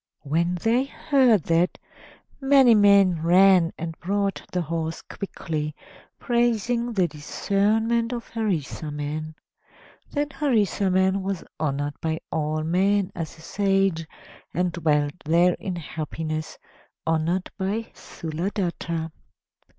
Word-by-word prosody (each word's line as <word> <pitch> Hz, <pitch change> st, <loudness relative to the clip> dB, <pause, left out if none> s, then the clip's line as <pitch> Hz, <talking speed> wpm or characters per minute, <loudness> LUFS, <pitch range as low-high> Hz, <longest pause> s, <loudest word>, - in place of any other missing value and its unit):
When 170 Hz, +5 st, 0 dB
they 230 Hz, +8 st, +1 dB
heard 265 Hz, -, +3 dB
that, 170 Hz, +3 st, +1 dB, 0.6 s
many 270 Hz, -3 st, +6 dB
men 200 Hz, -5 st, +5 dB
ran 180 Hz, 0 st, +5 dB
and 165 Hz, 0 st, -5 dB
brought 200 Hz, +2 st, -1 dB
the 180 Hz, -1 st, 0 dB
horse 165 Hz, 0 st, -3 dB
quickly, 155 Hz, -6 st, -5 dB, 0.4 s
praising 240 Hz, 0 st, 0 dB
the 185 Hz, -4 st, +2 dB
discernment 215 Hz, +9 st, 0 dB
of 240 Hz, -1 st, -5 dB
Harisarman. 155 Hz, -, -3 dB, 0.7 s
Then 290 Hz, 0 st, -1 dB
Harisarman 195 Hz, -, +1 dB
was 190 Hz, -2 st, -3 dB, 0.2 s
honored 145 Hz, -1 st, -2 dB
by 160 Hz, -1 st, -1 dB
all 155 Hz, 0 st, -1 dB
men 190 Hz, +4 st, +2 dB
as 165 Hz, -3 st, -6 dB
a -, -, -15 dB
sage, 195 Hz, -3 st, +1 dB, 0.5 s
and 180 Hz, 0 st, +1 dB
dwelt 150 Hz, -4 st, +1 dB
there 170 Hz, +3 st, +4 dB
in 185 Hz, -2 st, -4 dB
happiness, 155 Hz, -1 st, -5 dB, 0.5 s
honored 165 Hz, +3 st, 0 dB
by 210 Hz, +3 st, -3 dB
Sthuladatta. 170 Hz, -1 st, -4 dB
180 Hz, 105 wpm, -24 LUFS, 160-205 Hz, 0.7 s, many